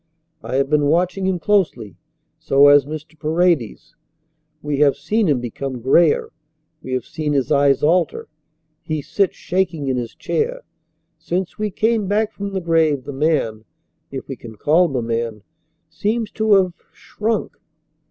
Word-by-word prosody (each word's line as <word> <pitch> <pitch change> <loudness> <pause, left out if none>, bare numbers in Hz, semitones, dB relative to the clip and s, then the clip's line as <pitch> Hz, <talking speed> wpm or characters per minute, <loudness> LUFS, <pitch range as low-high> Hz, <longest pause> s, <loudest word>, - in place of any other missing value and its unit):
I - - -5
have 135 0 +2
been 150 0 +2
watching 180 +4 +1
him 190 -1 +1
closely. 165 - 0 0.4
So 140 +1 +5
has 145 -1 +5
Mr. 155 +1 -8
Paredes. 160 - 0 0.7
We 145 -1 -2
have 145 -2 +4
seen 200 +9 0
him 140 -4 +2
become 125 +2 -5
grayer. 145 +6 +3 0.5
We 130 - -6
have 130 - -2
seen 155 -2 -3
his 135 -1 0
eyes 140 -1 +3
alter. 170 +2 +1 0.5
He 155 -2 -4
sits 195 +4 0
shaking 170 -6 -1
in 130 - 0
his 120 -2 -5
chair. - - -2 0.6
Since 175 +5 -3
we 215 0 0
came 220 +1 0
back 210 +2 +1
from 200 -2 -5
the 190 -1 -3
grave 160 -5 +2
the 145 - -7
man 135 -7 0 0.5
if 135 -1 -7
we 135 - -5
can 115 -3 -11
call 155 - +3
him 145 -6 -3
a 120 - 0
man 115 -2 -3 0.4
seems 210 +8 -2
to 220 -1 +2
have 185 -2 +2 0.2
shrunk." 215 0 -3
155 Hz, 160 wpm, -20 LUFS, 135-185 Hz, 0.7 s, So